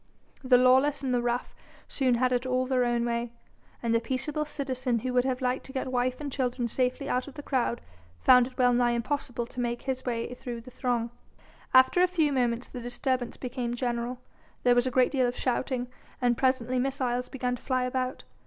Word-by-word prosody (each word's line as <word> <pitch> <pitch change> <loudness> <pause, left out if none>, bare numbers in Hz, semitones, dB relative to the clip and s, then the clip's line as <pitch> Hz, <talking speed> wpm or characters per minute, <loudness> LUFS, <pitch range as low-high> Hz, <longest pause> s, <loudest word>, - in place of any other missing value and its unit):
The 255 -1 +6
lawless 265 +3 +4
and 260 -2 0
the 245 - +2
rough 240 +1 -2 0.3
soon 255 -3 +2
had 255 +1 +2
it 250 +1 0
all 255 0 +1
their 255 -1 +2
own 240 -1 +1
way, 235 0 -2 0.5
and 230 -1 +1
the 230 - +4
peaceable 275 +6 -2
citizen 260 -4 -2
who 250 +3 -3
would 250 0 +3
have 260 0 -1
liked 255 0 0
to - - -9
get 260 -1 -3
wife 250 0 0
and 290 -2 -5
children 250 -2 -1
safely 255 +3 -1
out 250 +2 -1
of 285 - -10
the 290 - -8
crowd 250 -4 0 0.4
found 250 - +6
it 255 - -15
well 250 -1 +4
nigh 240 0 +3
impossible 245 0 -2
to 250 - -9
make 240 0 -2
his 260 -1 -2
way 235 0 -2
through 245 -2 -6
the 255 - -13
throng. 240 -2 -1 0.6
After 260 +7 +6
a 365 - +6
few 320 -5 +1
moments 245 -2 0
the 250 - -8
disturbance 245 +1 -2
became 245 -1 -3
general; 240 0 -2 0.5
there 245 - +5
was 245 +1 +3
a - - -1
great 255 0 +3
deal 260 -3 +2
of 245 - -3
shouting 250 0 -1 0.3
and 245 -1 +2
presently 255 -1 +1
missiles 250 -2 -1
began 250 -2 -2
to - - -20
fly 255 -2 0
about. 255 0 -2
250 Hz, 210 wpm, -28 LUFS, 245-260 Hz, 0.6 s, The